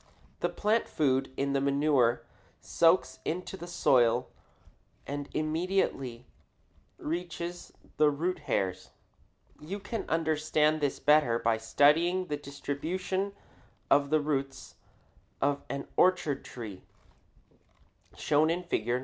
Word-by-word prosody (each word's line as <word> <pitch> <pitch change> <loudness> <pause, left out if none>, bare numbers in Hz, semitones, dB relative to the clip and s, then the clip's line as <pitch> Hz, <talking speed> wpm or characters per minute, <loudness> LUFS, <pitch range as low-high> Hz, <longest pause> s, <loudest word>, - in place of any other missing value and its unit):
The - - 0
plant 215 +2 +1
food 135 -3 +1
in 140 0 0
the 135 - +1
manure 140 -4 +2 0.3
soaks 165 -6 +2
into 180 +3 -3
the 175 -2 -9
soil 125 -7 +3 0.8
and 145 0 -5
immediately 155 -7 -1 0.7
reaches 170 +1 -5 0.3
the 150 -1 +5
root 170 +5 -2
hairs. 95 -9 -2 0.7
You 185 +7 -6
can 210 +2 -5
understand 155 -1 +1
this 145 -2 0
better 150 -6 +4
by 115 -1 +1
studying 160 +10 +3
the 150 -4 -3
distribution 160 +8 -3 0.6
of 140 0 +4
the 155 +1 +3
roots 140 -2 -3 0.7
of 140 0 +1
an 140 0 -4
orchard 180 -6 +2
tree, 110 -6 -8 1.3
shown 150 +1 +2
in 175 +2 -1
Fig. 120 -9 -2
150 Hz, 110 wpm, -29 LUFS, 135-170 Hz, 1.3 s, the